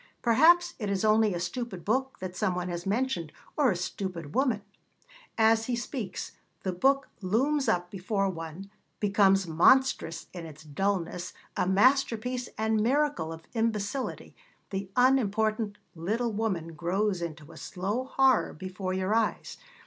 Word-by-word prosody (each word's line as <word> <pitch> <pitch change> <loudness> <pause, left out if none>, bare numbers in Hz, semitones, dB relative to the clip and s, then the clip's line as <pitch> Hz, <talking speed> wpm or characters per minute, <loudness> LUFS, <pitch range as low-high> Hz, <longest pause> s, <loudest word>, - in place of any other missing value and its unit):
Perhaps 340 +9 +5
it 210 -3 -2
is 200 +1 0
only 215 0 +4
a - - -2
stupid 185 0 -4
book 265 +5 0
that 185 -1 -6
some 185 -1 0
one 180 0 -3
has 175 +1 -4
mentioned, 200 -7 -1 0.2
or 290 -4 +4
a 190 - +1
stupid 175 -3 -5
woman; 250 -6 +1 0.7
as 225 0 +4
he 245 - 0
speaks, 235 -5 -5 0.3
the 185 - 0
book 275 +10 +2
looms 260 +8 +1
up 175 -3 0
before 195 +1 -1
one, 170 +2 -6 0.3
becomes 195 -2 +4
monstrous 170 +1 +3
in 175 -2 -7
its 155 0 -12
dulness, 180 +2 -2 0.2
a - - 0
masterpiece 245 +3 +2
and 220 0 +1
miracle 265 - +1
of 165 0 -8
imbecility; 225 +2 -2 0.4
the 195 -1 -3
unimportant 220 -4 +2 0.2
little 215 +8 -1
woman 190 -7 -2
grows 185 +4 0
into 155 -2 -6
a - - -13
slow 205 +8 -3
horror 265 -2 +3
before 185 +2 -5
your 190 +2 0
eyes. 225 -1 -1
205 Hz, 145 wpm, -28 LUFS, 180-240 Hz, 0.7 s, Perhaps